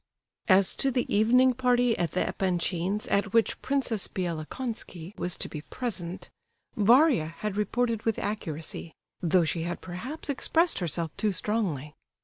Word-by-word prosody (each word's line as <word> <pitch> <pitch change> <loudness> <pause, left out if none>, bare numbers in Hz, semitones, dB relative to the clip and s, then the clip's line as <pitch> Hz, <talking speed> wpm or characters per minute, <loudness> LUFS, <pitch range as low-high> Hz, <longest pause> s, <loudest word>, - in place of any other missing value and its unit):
As 190 -1 +5
to 275 - +2
the 250 -2 0
evening 250 +5 +5
party 245 -1 +2
at 170 - -1
the 180 - -1
Epanchins' 185 +2 -1
at 200 0 +1
which 230 -1 +2
Princess 255 -7 0
Bielokonski 180 +1 -5
was 180 -1 -1
to - - -3
be 150 - -7
present, 185 -3 -5 0.4
Varia 235 - +5
had 210 -2 -3
reported 225 +2 0
with 225 -1 0
accuracy; 165 -5 -4 0.3
though 175 +1 +3
she 165 +1 -1
had 175 +1 -3
perhaps 230 - -7
expressed 325 +4 +1
herself 170 -2 -2
too 215 - +1
strongly. 180 - -2
205 Hz, 140 wpm, -28 LUFS, 175-245 Hz, 0.4 s, As